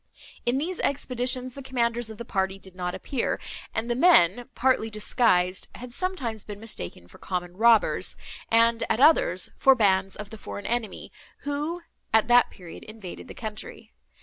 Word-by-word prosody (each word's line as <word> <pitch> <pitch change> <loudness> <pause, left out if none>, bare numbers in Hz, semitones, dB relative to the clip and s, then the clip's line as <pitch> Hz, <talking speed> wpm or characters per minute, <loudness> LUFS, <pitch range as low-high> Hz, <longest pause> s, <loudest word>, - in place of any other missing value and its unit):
In 245 +2 +2
these 340 +6 -3
expeditions 255 -2 -1
the 275 - -8
commanders 240 -3 -1
of 220 - -9
the 235 - -7
party 190 -2 -1
did 190 -1 -12
not 180 -1 -3
appear, 265 -4 -2 0.3
and 225 +1 -2
the 240 - +1
men, 245 - +5
partly 245 -2 +2
disguised, 210 -4 +1
had 245 0 -9
sometimes 245 - -2
been 205 -1 -8
mistaken 140 - -7
for - - -17
common 180 -1 -4
robbers, 225 +1 +3 0.3
and, 230 0 +4
at - - +1
others, 260 - +4
for 270 0 +6
bands 195 -4 +2
of 210 -1 -8
the 220 - -9
foreign 205 - -7
enemy, 230 -4 -3 0.3
who, 300 +5 -3 0.3
at 220 0 +4
that 245 0 +6
period, 175 -4 -11
invaded 215 -5 -10
the - - -10
country. 215 -2 -8
225 Hz, 165 wpm, -26 LUFS, 195-255 Hz, 0.3 s, for